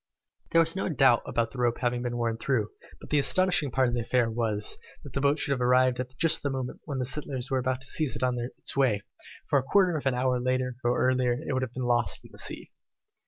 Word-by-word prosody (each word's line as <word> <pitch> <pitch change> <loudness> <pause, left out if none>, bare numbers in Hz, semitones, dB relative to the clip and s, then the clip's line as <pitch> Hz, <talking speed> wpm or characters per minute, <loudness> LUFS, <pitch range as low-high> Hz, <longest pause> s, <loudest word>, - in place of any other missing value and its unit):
There 165 - +5
was 165 +1 +1
no 190 - -2
doubt 135 -6 +4
about 115 -1 -1
the 130 - -9
rope 120 -1 +1
having 120 -1 -1
been 120 -1 -3
worn 115 -1 -1
through, 115 -6 -1 0.3
but - - -13
the 150 - +3
astonishing 180 0 +3
part 130 +1 +2
of 120 - -2
the 120 - 0
affair 120 0 +1
was, 110 -2 -1 0.2
that 140 - -11
the 140 - -2
boat 140 +1 +2
should 145 - -1
have 130 -2 0
arrived 125 0 +3 0.2
just 165 -1 +5
at - - -16
the 140 - -1
moment 130 -2 -5
when 140 -3 -4
the 130 - -1
settlers 135 -1 -3
were 130 -1 +1
there 130 +1 0
to 135 +1 -8
seize 150 0 0
it - - -3
on 125 -1 0
its 120 +1 -4
way, 125 -7 +2 0.5
for 140 - +3
a - - -4
quarter 180 +4 +3
of 145 -3 -2
an 130 - +1
hour 125 0 +1
earlier 130 0 -1
or 125 +1 +2
later 125 -1 +1
it - - -1
would 130 - 0
have 130 -2 -4
been 130 - -4
lost 120 -1 +1
in - - -15
the - - -11
sea. - - -4
130 Hz, 260 wpm, -27 LUFS, 120-140 Hz, 0.5 s, There